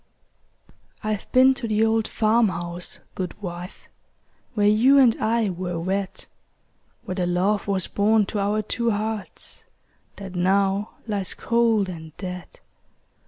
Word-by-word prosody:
I've 215 Hz, -1 st, -3 dB
been 260 Hz, +1 st, +6 dB
to 245 Hz, -2 st, -5 dB
the 215 Hz, 0 st, +2 dB
old 225 Hz, 0 st, +1 dB
farm 225 Hz, +1 st, +3 dB
house, 175 Hz, 0 st, -5 dB, 0.2 s
good 185 Hz, +1 st, -5 dB
wife, 180 Hz, -2 st, -7 dB, 0.7 s
Where 205 Hz, -2 st, +2 dB
you 230 Hz, +7 st, +5 dB
and 250 Hz, -5 st, +6 dB
I 225 Hz, -2 st, +1 dB
were 180 Hz, -1 st, -4 dB
wed; 190 Hz, +3 st, -3 dB, 0.8 s
Where -, -, -4 dB
the 180 Hz, -1 st, -1 dB
love 190 Hz, +4 st, +1 dB
was 195 Hz, -3 st, +1 dB
born 210 Hz, +1 st, +2 dB
to 205 Hz, -, -3 dB
our 205 Hz, +2 st, 0 dB
two 235 Hz, +2 st, -1 dB
hearts 215 Hz, -1 st, -3 dB, 0.5 s
That 195 Hz, -2 st, -8 dB
now 195 Hz, +3 st, +1 dB
lies 205 Hz, -4 st, -3 dB
cold 230 Hz, -3 st, +2 dB
and 160 Hz, -3 st, -9 dB
dead. 180 Hz, -2 st, -7 dB
205 Hz, 135 wpm, -24 LUFS, 185-220 Hz, 0.8 s, been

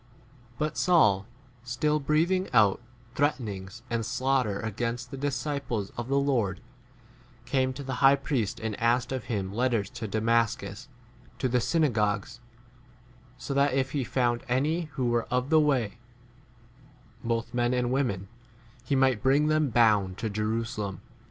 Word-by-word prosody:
But 150 Hz, +2 st, -2 dB
Saul, 105 Hz, -, +4 dB, 0.4 s
still 150 Hz, +5 st, 0 dB
breathing 165 Hz, +6 st, +1 dB
out 105 Hz, 0 st, +4 dB, 0.3 s
threatenings 115 Hz, -7 st, -2 dB
and 115 Hz, -2 st, -1 dB
slaughter 125 Hz, -3 st, 0 dB
against 120 Hz, +3 st, -3 dB
the -, -, -5 dB
disciples 140 Hz, -6 st, -2 dB
of 120 Hz, 0 st, -4 dB
the 140 Hz, +1 st, +1 dB
Lord, 130 Hz, -9 st, +1 dB, 0.9 s
came 130 Hz, -1 st, +1 dB
2 -, -, -10 dB
to 140 Hz, -, -6 dB
the 135 Hz, 0 st, -4 dB
high 135 Hz, 0 st, +7 dB
priest 135 Hz, -6 st, -2 dB
and 110 Hz, -2 st, -3 dB
asked 120 Hz, +2 st, +1 dB
of 130 Hz, -3 st, -3 dB
him 100 Hz, -4 st, -3 dB
letters 115 Hz, -3 st, 0 dB
to 110 Hz, -, -5 dB
Damascus, 110 Hz, 0 st, 0 dB, 0.5 s
to 130 Hz, -, 0 dB
the 125 Hz, 0 st, +1 dB
synagogues, 120 Hz, -7 st, 0 dB, 1.0 s
so 140 Hz, -, -5 dB
that 140 Hz, -1 st, +2 dB
if 130 Hz, -1 st, 0 dB
he 140 Hz, -2 st, -1 dB
found 120 Hz, -1 st, 0 dB
any 150 Hz, +7 st, +1 dB
who 130 Hz, -2 st, -1 dB
were 120 Hz, -1 st, +1 dB
of 125 Hz, +3 st, -1 dB
the 160 Hz, -, +6 dB
way, 125 Hz, -7 st, +1 dB, 1.2 s
both 115 Hz, 0 st, -2 dB
men 120 Hz, 0 st, +1 dB
and 125 Hz, -1 st, 0 dB
women, 120 Hz, -8 st, -1 dB, 0.6 s
he 140 Hz, -, 0 dB
might 130 Hz, -4 st, +3 dB
bring 135 Hz, +3 st, +3 dB
3 150 Hz, -, +1 dB
[them] 155 Hz, -2 st, +2 dB
bound 105 Hz, -5 st, +3 dB
to 110 Hz, -3 st, -3 dB
Jerusalem. 105 Hz, -2 st, -2 dB
125 Hz, 150 wpm, -28 LUFS, 110-135 Hz, 1.2 s, high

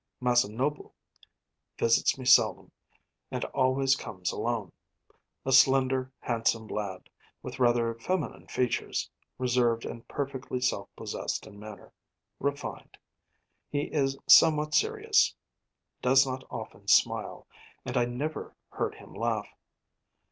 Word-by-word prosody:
Masanobu 125 Hz, +3 st, 0 dB, 0.9 s
visits 115 Hz, +3 st, +3 dB
me 130 Hz, -, -8 dB
seldom 125 Hz, 0 st, +4 dB, 0.6 s
and -, -, -3 dB
always 135 Hz, +1 st, +2 dB
comes 90 Hz, -8 st, -4 dB
alone. 115 Hz, -7 st, -2 dB, 0.7 s
A 135 Hz, -, 0 dB
slender, 130 Hz, -1 st, +4 dB
handsome 115 Hz, -1 st, 0 dB
lad, 100 Hz, -4 st, -5 dB, 0.4 s
with -, -, -7 dB
rather 120 Hz, -2 st, +3 dB
feminine 145 Hz, -, -3 dB
features, 125 Hz, -1 st, -1 dB, 0.3 s
reserved 120 Hz, -2 st, +1 dB
and 115 Hz, -, -8 dB
perfectly 135 Hz, -2 st, -4 dB
self 125 Hz, -, -1 dB
possessed -, -, -4 dB
in 100 Hz, -, -13 dB
manner, 105 Hz, -1 st, -11 dB, 0.5 s
refined. 140 Hz, +1 st, -4 dB, 0.7 s
He 145 Hz, 0 st, -3 dB
is 135 Hz, -3 st, +1 dB
somewhat 150 Hz, -1 st, +6 dB
serious, 440 Hz, 0 st, +3 dB, 0.7 s
does 130 Hz, +2 st, +5 dB
not 130 Hz, 0 st, -5 dB
often -, -, -8 dB
smile; -, -, +2 dB, 0.4 s
and 125 Hz, -, -4 dB
I 120 Hz, -1 st, +3 dB
never 140 Hz, +6 st, -5 dB
heard -, -, -3 dB
him -, -, -14 dB
laugh. -, -, -2 dB
130 Hz, 110 wpm, -28 LUFS, 115-135 Hz, 0.9 s, somewhat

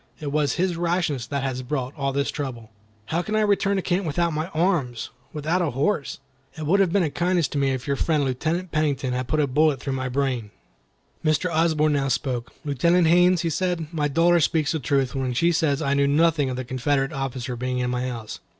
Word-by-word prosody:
It 145 Hz, -2 st, -4 dB
was 145 Hz, -2 st, +1 dB
his 180 Hz, -1 st, 0 dB
rashness 170 Hz, -7 st, -1 dB
that 140 Hz, 0 st, -2 dB
has 130 Hz, -1 st, -2 dB
brought 130 Hz, 0 st, -3 dB
all 140 Hz, -3 st, -1 dB
this 140 Hz, +1 st, -1 dB
trouble." 120 Hz, -6 st, -6 dB, 0.3 s
"How 165 Hz, +10 st, -1 dB
can 215 Hz, +4 st, -3 dB
I 215 Hz, -, +3 dB
return 200 Hz, -1 st, +2 dB
to 190 Hz, -, -1 dB
camp 180 Hz, 0 st, 0 dB
without 170 Hz, +2 st, 0 dB, 0.2 s
arms, 155 Hz, -, 0 dB, 0.2 s
without 155 Hz, +4 st, -1 dB
a 170 Hz, -, +1 dB
horse? 140 Hz, +5 st, -1 dB, 0.4 s
It 155 Hz, -, -4 dB
would 190 Hz, +7 st, +3 dB
have 190 Hz, -4 st, +3 dB
been 200 Hz, 0 st, +3 dB
a 155 Hz, -, -1 dB
kindness 175 Hz, +1 st, +1 dB
to 145 Hz, -, -2 dB
me 135 Hz, -1 st, +2 dB
if 130 Hz, -2 st, -2 dB
your 140 Hz, -, 0 dB
friend 150 Hz, 0 st, +1 dB
Lieutenant 160 Hz, +8 st, -2 dB
Pennington 140 Hz, -4 st, 0 dB
had 125 Hz, 0 st, -2 dB
put 155 Hz, +4 st, 0 dB
a 150 Hz, -, +3 dB
bullet 145 Hz, +1 st, +2 dB
through 135 Hz, +1 st, -3 dB
my 130 Hz, -1 st, -2 dB
brain." 125 Hz, -4 st, -1 dB, 0.7 s
Mr. 155 Hz, +3 st, +1 dB
Osborne 155 Hz, -2 st, +2 dB
now 140 Hz, -1 st, +1 dB
spoke. 130 Hz, -2 st, -2 dB
"Lieutenant 170 Hz, +5 st, +3 dB
Haines," 180 Hz, +1 st, +5 dB
he 165 Hz, -2 st, -1 dB
said, 175 Hz, -2 st, -2 dB
"my 150 Hz, -2 st, 0 dB
daughter 170 Hz, +4 st, +3 dB
speaks 155 Hz, -1 st, +1 dB
the 160 Hz, -, -1 dB
truth 135 Hz, 0 st, 0 dB
when 130 Hz, -2 st, -2 dB
she 170 Hz, +6 st, +3 dB
says 160 Hz, -3 st, +1 dB
I 140 Hz, -1 st, +1 dB
knew 140 Hz, 0 st, +3 dB
nothing 150 Hz, -1 st, +3 dB
of 130 Hz, -, -3 dB
the 130 Hz, 0 st, -4 dB
Confederate 135 Hz, +3 st, 0 dB
officer 130 Hz, -2 st, -3 dB
being 125 Hz, +1 st, -2 dB
in 125 Hz, 0 st, -1 dB
my 125 Hz, 0 st, -1 dB
house. 115 Hz, -4 st, -6 dB
145 Hz, 220 wpm, -24 LUFS, 130-170 Hz, 0.7 s, Haines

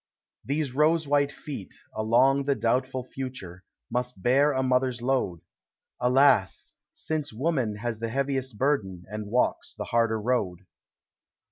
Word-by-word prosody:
These 140 Hz, -1 st, -2 dB
rose 155 Hz, +2 st, +3 dB
white 140 Hz, 0 st, +2 dB
feet, 140 Hz, -9 st, -8 dB, 0.2 s
along 125 Hz, +6 st, +3 dB
the 140 Hz, -1 st, +2 dB
doubtful 130 Hz, +2 st, 0 dB
future, 125 Hz, -9 st, -7 dB, 0.3 s
Must 125 Hz, -5 st, -3 dB
bear 140 Hz, +4 st, +4 dB
a 130 Hz, -1 st, 0 dB
mother's 130 Hz, -1 st, +1 dB
load; 120 Hz, -9 st, 0 dB, 0.6 s
Alas! 125 Hz, -5 st, +3 dB, 0.2 s
since 155 Hz, -2 st, -3 dB
Woman 130 Hz, -3 st, -1 dB
has 115 Hz, +1 st, -4 dB
the 115 Hz, 0 st, -2 dB
heaviest 135 Hz, -2 st, -2 dB
burden, 100 Hz, -11 st, 0 dB
And 105 Hz, -1 st, -5 dB
walks 125 Hz, +4 st, 0 dB
the -, -, -5 dB
harder 115 Hz, -1 st, +1 dB
road. 105 Hz, -6 st, -1 dB
125 Hz, 130 wpm, -27 LUFS, 110-140 Hz, 0.6 s, bear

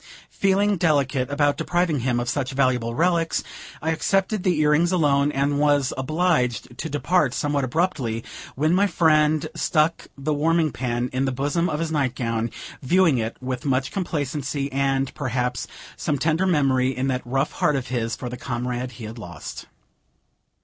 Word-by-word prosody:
Feeling 200 Hz, +1 st, +2 dB
delicate 140 Hz, -6 st, +1 dB
about 145 Hz, 0 st, +1 dB
depriving 175 Hz, -4 st, 0 dB
him 125 Hz, 0 st, 0 dB
of 120 Hz, -, -3 dB
such 130 Hz, +2 st, -2 dB
valuable 125 Hz, -3 st, +1 dB
relics, 170 Hz, +1 st, +1 dB, 0.4 s
I 160 Hz, -, +1 dB
accepted 195 Hz, +4 st, 0 dB
the 180 Hz, -4 st, +1 dB
earrings 155 Hz, +3 st, +3 dB
alone, 145 Hz, -5 st, +3 dB
and 140 Hz, +1 st, 0 dB
was 145 Hz, -3 st, +2 dB
obliged 130 Hz, -, 0 dB
to 160 Hz, -, -3 dB
depart, 145 Hz, -1 st, +1 dB
somewhat 145 Hz, -1 st, 0 dB
abruptly, 130 Hz, -6 st, -1 dB, 0.3 s
when 155 Hz, +5 st, +2 dB
my 200 Hz, +3 st, +4 dB
friend 155 Hz, -3 st, +3 dB
stuck 160 Hz, -1 st, +1 dB
the 145 Hz, +3 st, -1 dB
warming 160 Hz, +1 st, +2 dB
pan 120 Hz, 0 st, -2 dB
in 130 Hz, +1 st, 0 dB
the 135 Hz, -, 0 dB
bosom 145 Hz, +7 st, 0 dB
of 150 Hz, -, -2 dB
his 165 Hz, -1 st, -2 dB
night 135 Hz, -5 st, 0 dB
gown, 115 Hz, -2 st, -1 dB, 0.3 s
viewing 165 Hz, -1 st, +3 dB
it 115 Hz, 0 st, -3 dB
with 130 Hz, +1 st, -3 dB
much 130 Hz, -2 st, 0 dB
complacency, 145 Hz, -5 st, -2 dB
and, 135 Hz, 0 st, 0 dB
perhaps, 125 Hz, -3 st, -2 dB, 0.3 s
some 150 Hz, -, -1 dB
tender 160 Hz, +6 st, +1 dB
memory, 135 Hz, -6 st, +2 dB
in 130 Hz, -, 0 dB
that 130 Hz, -1 st, -1 dB
rough 135 Hz, +4 st, -1 dB
heart 150 Hz, -, +1 dB
of 135 Hz, -2 st, -3 dB
his, 115 Hz, -2 st, -1 dB
for 125 Hz, -, -6 dB
the 125 Hz, 0 st, -6 dB
comrade 125 Hz, 0 st, -3 dB
he 115 Hz, -, -10 dB
had 110 Hz, +2 st, -7 dB
lost. 85 Hz, -7 st, -8 dB
140 Hz, 165 wpm, -23 LUFS, 125-160 Hz, 0.4 s, my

